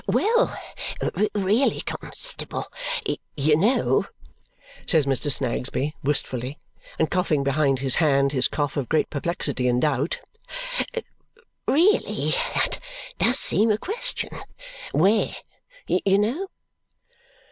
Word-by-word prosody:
"Well! 470 +4 +2 0.8
Really, 205 +6 +2
constable, - - -2 0.7
you 150 +1 +3
know," 210 - +2 0.8
says 160 -5 +3
Mr. 140 +2 +2
Snagsby 130 +2 +1
wistfully, 135 -1 -1 0.4
and 160 - 0
coughing 165 -6 +1
behind 140 0 +2
his 130 -1 +1
hand 140 -3 +3
his 130 -3 +3
cough 145 -1 -2
of 135 -4 -2
great 160 - +1
perplexity 145 -4 -1
and 125 0 +2
doubt, 145 +1 0 1.5
"really, 360 +9 +2 0.2
that - - +1 0.4
does - - +4
seem 220 +2 +4
a 210 - +3
question. 475 - -1 0.6
Where, 200 +7 +2 0.5
you 195 +1 +2
know?" 245 - 0
155 Hz, 105 wpm, -24 LUFS, 140-210 Hz, 1.5 s, does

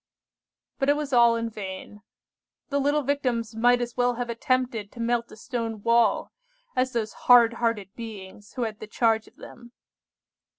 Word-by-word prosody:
"But 275 0 +1
it 290 - +5
was 295 -2 -4
all 235 -1 +6
in 230 0 -2
vain. 205 -1 -8 0.7
The 285 -1 0
little 290 +2 +1
Victims 250 -5 -1
might 245 +2 +3
as 240 0 -4
well 245 0 +1
have 240 0 -3
attempted 235 -3 -1
to 240 - -12
melt 235 0 -1
a - - -11
stone 225 -2 -4
wall 230 -3 +2 0.4
as 255 0 0
those 220 -2 -2 0.2
hard 235 -2 +8
hearted 210 -5 -1
beings 205 -3 -10
who 250 - -2
had 220 -2 -4
the 215 - -8
charge 225 0 +1
of - - -20
them. 240 0 -13
235 Hz, 170 wpm, -26 LUFS, 220-245 Hz, 0.7 s, hard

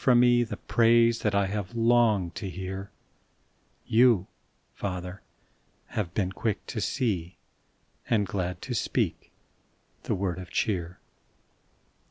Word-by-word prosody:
from 125 -2 +5
me 120 0 +5
The 110 -3 -5
praise 115 0 +4
that 105 -2 0
I 100 0 +3
have 100 +2 -4
longed 115 -6 +3
to 100 +1 -5
hear, 95 +2 -6 1.0
Y>u, 115 -5 +5 0.5
Father, 90 -1 -5 0.7
have 95 -5 -3
been 95 -3 0
quick 105 +1 -2
to 110 - -4
see 100 - -1 0.7
Ar^d 105 -3 +3
glad 90 -2 -3
to - - -4
speak - - -1 0.7
the - - -1
word 95 -2 -2
of 90 -1 -9
cheer. 90 -5 -1
100 Hz, 125 wpm, -27 LUFS, 90-115 Hz, 1.0 s, from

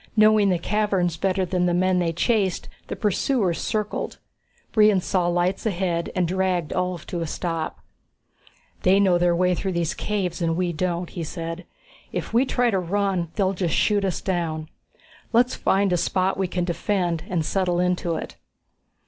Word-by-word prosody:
Knowing 215 -1 +5
the 180 - +2
caverns 195 -2 0
better 190 +2 0
than 180 0 0
the 175 - +1
men 185 0 +2
they 170 -2 +1
chased, 195 +1 0 0.2
the - - -4
pursuers 205 -2 0
circled. 210 -1 -2 0.5
Brion 210 -3 +5
saw 180 -1 0
lights 175 +2 0
ahead 175 -4 -1
and 180 -2 +1
dragged 185 -3 0
Ulv 180 -2 -2
to 175 - -4
a 165 - -2
stop. 165 0 -3 1.0
"They 190 +2 +4
know 185 -3 +4
their 175 0 +3
way 180 +1 +2
through 190 +1 -2
these 170 +1 0
caves, 195 -5 -2
and 165 -1 0
we 180 -1 0
don't," 175 +1 -2
he 170 - -4
said. 165 +2 -5 0.5
"If - - -4
we 240 +4 +4
try 245 -2 +2
to 195 - +1
run 185 -1 -1
they'll 195 -2 +1
just 175 -4 -1
shoot 205 -2 +2
us 190 -3 -1
down. 160 -4 -2 0.6
Let's 245 +2 +4
find 195 -1 +1
a - - +3
spot 185 +2 +1
we 190 0 -1
can 180 0 -2
defend 175 -1 -1
and 170 -4 0
settle 180 -1 0
into 180 -2 0
it." - - -6
180 Hz, 175 wpm, -24 LUFS, 175-195 Hz, 1.0 s, Knowing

